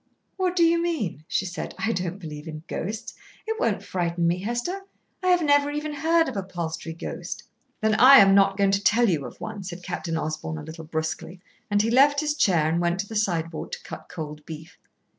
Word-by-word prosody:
"What 365 -1 0
do 345 - +4
you 335 0 +4
mean?" 230 - -2
she 190 - 0
said. 180 -1 -5
"I 220 +1 0
don't 185 -3 -2
believe 155 -4 -8
in 155 -1 -7
ghosts. 220 +7 -4 0.3
It 445 0 -3
won't - - 0
frighten 170 -1 -1
me, 170 +2 +2
Hester. 240 - -2 0.4
I 365 -1 +5
never 290 -4 +3
even 295 +1 -3
heard 325 +3 +2
of 265 - -4
a 195 - -1
Palstrey 170 -3 -5
ghost." 165 - -6 0.4
"Then 220 0 +2
I 260 +5 +9
am 195 -3 +7
not 195 0 +4
going 200 -1 +3
to 200 +1 +1
tell 235 +4 +4
you 160 -8 0
of - - -13
one," 215 -2 -6
said 180 -1 -7
Captain 170 -2 -3
Osborn 155 0 -3
a 150 - -7
little 160 +1 -9
brusquely, 160 +3 -4 0.3
and 205 0 +3
he 225 - 0
left 285 +3 +5
his 300 -1 0
chair 175 - +3
and 165 +2 +1
went 175 +1 0
to 205 - -9
the 220 - -8
sideboard 170 -6 -1
to - - -6
cut - - -9
cold 150 -3 -7
beef. 160 +2 -9
195 Hz, 215 wpm, -25 LUFS, 165-270 Hz, 0.4 s, I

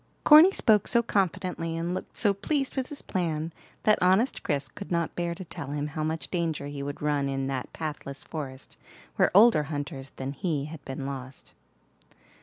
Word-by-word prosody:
Corny 310 +5 +9
spoke 215 - +3
so 235 -1 +3
confidently, 180 -5 -1
and 170 +2 -2
looked 185 - -6
so 205 -3 +4
pleased 270 +7 -1
with 260 -2 -1
his 295 - -7
plan, 165 -3 -2 0.3
that 215 - +4
honest 190 +8 +3
Chris 145 -5 -1
could 200 - -10
not 170 -1 0
bear 170 -1 -2
to 185 - -8
tell 160 - -7
him 145 +1 -2
how 155 +1 -3
much 160 +1 -3
danger 165 -5 -1
he 145 -1 -6
would 140 +1 -5
run 145 -2 +1
in 135 0 -2
that 135 -2 -3
pathless 145 -3 -6
forest, 135 -4 -7 0.4
where - - +4
older 215 -5 +7
hunters 145 -2 -5
than 135 +1 -4
he 145 -1 -2
had 150 -2 -9
been 135 0 -5
lost. 135 -1 -7
160 Hz, 185 wpm, -27 LUFS, 140-190 Hz, 0.4 s, Corny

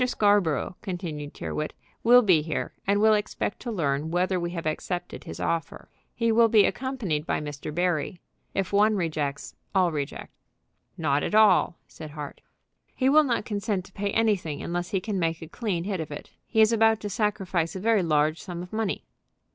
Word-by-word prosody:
Scarborough," 205 - +2
continued 170 -8 -5
Tyrrwhit, 155 - -4 0.3
"will 245 +2 +7
be 180 -7 +5
here, 155 0 -3
and 200 +1 +3
will 220 +1 +5
expect 210 -1 -2
to 240 - -5
learn 150 -5 -1
whether 180 +2 +1
we 170 0 -2
have 170 -2 -5
accepted 175 +3 -3
his - - -7
offer. 165 -3 -3 0.3
He 230 -1 +1
will 230 +1 +5
be 215 -3 +5
accompanied 225 - -2
by - - 0
Mr. 150 0 -6
Barry. 175 +1 -1 0.4
If 195 0 -1
one 210 +2 +4
rejects, 155 -6 -2 0.2
all 185 -2 +4
reject." 145 -3 -5 0.6
"Not 145 -3 +1
at - - -1
all," 215 -5 +5
said 155 - -10
Hart. 150 -1 -8 0.5
"He 260 0 +2
will 305 +3 +7
not 240 -6 0
consent 205 -3 -2
to 190 - -16
pay 200 0 -2
anything 200 -9 0
unless 175 +1 -3
he 195 - 0
can 200 0 -3
make 165 -1 0
a - - -8
clean 185 -2 -2
hit 195 -1 -2
of 160 - -4
it. 145 - -8 0.2
He 220 - +3
is 220 +1 +6
about 225 -1 +4
to 205 - -4
sacrifice 195 -6 -1
a - - -3
very 220 +1 +3
large 155 -1 +1
sum 175 -3 -6
of 180 - -12
money." 220 -2 -1
185 Hz, 185 wpm, -26 LUFS, 160-215 Hz, 0.6 s, will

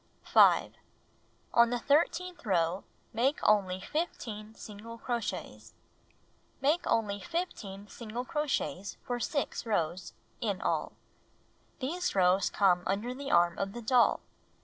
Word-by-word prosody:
5. - - +5 0.8
On 235 0 +6
the 245 - 0
thir 285 +6 +4
teenth 360 0 -8
row, 180 -3 +1 0.3
make 255 +6 +2
only 190 -3 +3
15 220 - -4
single 225 +2 -9
crochets. 235 -2 -4 0.8
Make 300 +6 +1
only 205 -3 +1
15 205 - -5
single 235 +3 -6
crochets 285 - -2
for 245 -1 -3
6 285 +3 -2
rows 175 -4 -1 0.3
(in 205 -6 -1
all). - - -1 0.8
These 320 - -2
rows 185 +1 +4
come 185 -3 +3
under 210 +6 -1
the 275 +2 -6
arm 175 0 +3
of 195 0 -2
the 240 - -6
doll. 245 +1 +4
225 Hz, 125 wpm, -30 LUFS, 195-270 Hz, 0.8 s, On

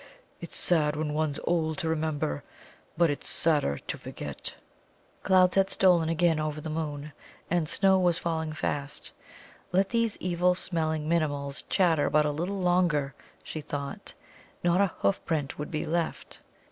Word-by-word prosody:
It's 170 - -8
sad 150 -4 +2
when 150 0 -2
one's 155 -2 0
old 160 -2 0
to 170 - -2
remember, 155 - -1 0.5
but 170 -2 +4
it's 145 - -5
sadder 150 - +2
to - - -5
forget." - - -5 0.7
Clouds 185 -1 +5
had 195 0 +4
stolen 175 -5 +4
again 165 -1 +2
over 155 0 -2
the 155 +1 -5
moon, 150 -2 -4 0.4
and 170 -3 +1
snow 190 -1 +4
was 175 -2 +3
falling 160 -2 -2
fast. 145 -2 -3 0.6
Let 190 +2 +3
these 230 -2 +1
evil 180 0 +2
smelling 160 -4 -1
Minimuls 145 -4 0
chatter 165 -6 +3
but 150 0 +3
a 150 - +1
little 175 +7 -2
longer, 175 -6 +2 0.3
she 155 - -5
thought; 140 -1 -5 0.5
not 175 +2 +4
a 200 - +5
hoof 100 - -1
print 150 -4 -2
would 150 - -4
be 155 0 -2
left. 165 +1 -2
160 Hz, 155 wpm, -28 LUFS, 150-175 Hz, 0.7 s, Clouds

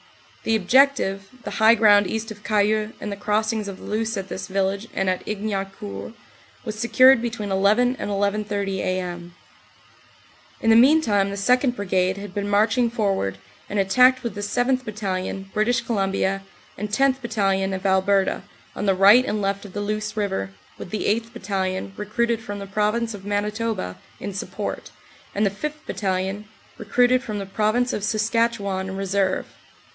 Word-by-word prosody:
The 225 - +1
objective, 215 -2 +3 0.2
the - - -5
high 220 +1 +7
ground 205 -3 +5
east 220 0 -3
of 210 -1 -11
Cayeux 215 +1 +1
and 210 - -5
the - - -3
cross 215 +2 0
ings 215 -2 -3
of 195 -1 -6
the - - -14
Luce 220 +1 -2
at 195 0 -5
this 185 - -5
village 195 +2 -1
and 195 - 0
at 185 -1 0
Ignaucourt, 195 - -4 0.5
was 215 -1 -5
secured 255 +1 +6
between 230 -4 -4
11 215 +6 +3
and - - -3
11.30a.m. 195 -4 -2 1.2
In 225 - 0
the - - +7
meantime 235 -6 +4
the 200 - -4
2nd. 250 +5 +2
Brigade 190 -2 0
had 200 -2 -8
been 205 0 -3
marching 220 +4 +3
for 215 -4 0
ward, 95 - -2 0.3
and 205 - -3
attacked 250 +7 +4
with 235 -4 -3
the 205 - -6
7th. 245 +5 0
Battalion, 195 -3 -4
British 235 +3 +1
Columbia, 195 -3 -1 0.3
and 210 +2 -4
10th. 265 +5 +2
Battalion, 195 -5 0
of 190 0 -5
Alberta, 190 0 +2 0.3
on 205 - -3
the 195 - +3
right 200 +6 +7
and 215 -4 -2
left 200 +1 -1
of 195 - -11
the 205 - -3
Luce 215 +1 -3
river, 190 - -1 0.3
with - - -7
the 215 - -3
8th. 225 +2 0
Battalion, 190 -3 -3
recruited 230 +2 -1
from 205 -2 -6
the 200 - -6
Prov 210 +2 0
ince 235 -1 -2
of 200 -2 -9
Manitoba, 210 - -2 0.2
in 200 - -5
support, 190 - -5 0.5
and 205 +1 +2
the 195 - +1
5th. 300 +9 -6
Battalion, 190 +1 -2 0.3
recruited 245 +4 +3
from 215 -4 -5
the 200 - -4
Province 215 +5 0
of 205 - -3
Saskatchewan, 215 -3 0
in 190 - -5
reserve. 195 -1 0
205 Hz, 170 wpm, -23 LUFS, 195-225 Hz, 1.2 s, high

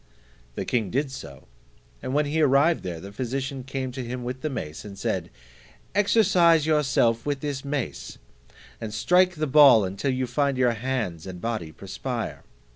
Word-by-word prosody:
The - - -3
king 110 -6 0
did 135 +6 -1
so, 70 - -10 0.5
and - - -4
when 150 +2 +2
he 155 +2 0
arrived 145 +3 +4
there, 85 -3 -5
the 100 +4 -9
physician 130 +4 -4
came 130 0 -4
to 125 +1 -5
him 125 +1 -5
with 125 +1 -5
the 155 - -2
mace, 80 - -6
and 100 -2 -9
said, - - -2 0.6
"Exercise 185 -6 +4
yourself 135 -7 +2
with 145 -2 -2
this 145 -3 -3
mace, 140 -2 -4 0.6
and 110 -2 -4
strike 180 0 +3
the 155 0 -1
ball 135 -6 +7
until 100 +9 -2
you 130 0 0
find 140 +2 0
your 125 -2 +3
hands 110 -8 -3
and 90 -1 -7
body 110 -7 -3
perspire. 100 - -5
130 Hz, 170 wpm, -25 LUFS, 115-145 Hz, 0.6 s, ball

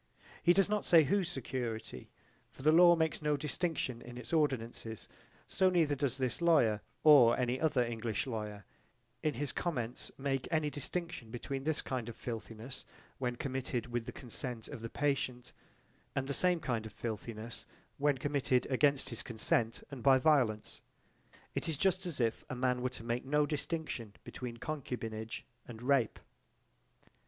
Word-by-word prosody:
He 175 - +6
does 195 +1 +4
not 210 0 0
say 165 -2 +7
whose 185 +4 +1
security, 115 - -4 0.4
for - - -13
the 155 - +6
law 175 +1 +8
makes 160 -1 0
no 150 -1 +1
distinction 145 -4 -2
in 120 0 -9
its 125 +6 -8
ordinances, 120 -7 -1 0.4
so 190 - +3
neither 165 -5 +3
does 135 -2 -1
this 130 +2 -1
lawyer 130 -11 +4 0.2
or 135 -7 +8
any 125 +1 0
other 140 -6 +3
English 115 -2 -2
lawyer 105 -5 -5 0.6
in 155 -2 0
his 145 +3 -2
comments 125 -8 -3
make 135 -1 -1
any 155 -2 +1
distinction 160 -4 -4
between 135 +4 -4
this 155 -1 0
kind 125 -3 -3
of 115 - -7
filthiness 115 +2 -6 0.4
when 125 -2 -1
committed 130 -4 -3
with 120 0 -2
the - - -3
consent 125 -2 -4
of 115 - -8
the 115 - -5
patient 130 -3 -1 0.6
and 135 0 -1
the 140 - -1
same 180 +3 +3
kind 120 -7 -2
of 105 - -12
filthiness 115 0 -6 0.3
when 145 -1 +3
committed 135 -2 +1
against 140 +1 +3
his 115 - -2
consent 115 0 0
and 135 -3 -7
by 135 0 +6
violence. 130 -7 +2 0.7
It - - -2
is 155 - -1
just 190 +1 +1
as 160 -6 -3
if 115 -2 0
a - - -3
man 125 0 +1
were 130 - 0
to 120 - -8
make 120 +1 -1
no 150 +2 +2
distinction 145 -6 -3
between 120 -2 -6
concubinage 115 -6 -4 0.2
and 115 -2 -8
rape. 125 -2 +2
130 Hz, 165 wpm, -33 LUFS, 115-150 Hz, 0.7 s, law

